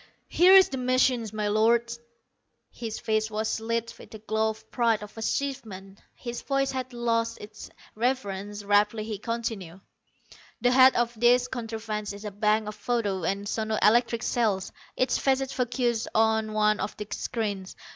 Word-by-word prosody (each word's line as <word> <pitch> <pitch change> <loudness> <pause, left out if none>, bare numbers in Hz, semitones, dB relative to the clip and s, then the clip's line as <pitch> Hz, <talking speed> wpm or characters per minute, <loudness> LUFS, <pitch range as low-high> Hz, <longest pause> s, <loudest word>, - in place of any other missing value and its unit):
"Here 370 +2 +6
is 380 -1 +7
the 265 - -4
machine, 255 -2 +2
my 215 -1 -2
Lords!" 235 +2 +2 0.7
His 225 -2 -6
face 220 0 0
was 220 +1 -2
lit 230 +1 -2
with - - -13
the 220 - -9
glow 220 +1 0
of 220 0 -9
pride 230 -3 +1
of 210 - -11
achievement. 220 -5 -4 0.2
His 240 -1 -6
voice 275 -1 0
had 260 -1 -4
lost 230 -1 -1
its 210 +1 -10 0.2
reverence. 205 -4 -2
Rapidly 205 +2 +2
he 215 -2 -5
continued: 220 -6 -4 0.8
"The 245 - +2
head 260 +1 +7
of 240 0 +1
this 245 +2 +4
contrivance 220 -4 -5
is 200 +1 -10
a 210 - -4
bank 210 +1 +1
of 210 - -4
photo 210 -5 -2
and 200 +2 -2
sono 220 0 -1
electric 235 +2 +3
cells, 210 -6 0 0.3
each 255 -1 +1
facet 270 0 +1
focussed 240 -2 -1
on 220 0 +2
one 215 0 +2
of 210 - -4
the 210 - -5
screens. 205 -5 -3
225 Hz, 160 wpm, -27 LUFS, 210-240 Hz, 0.8 s, is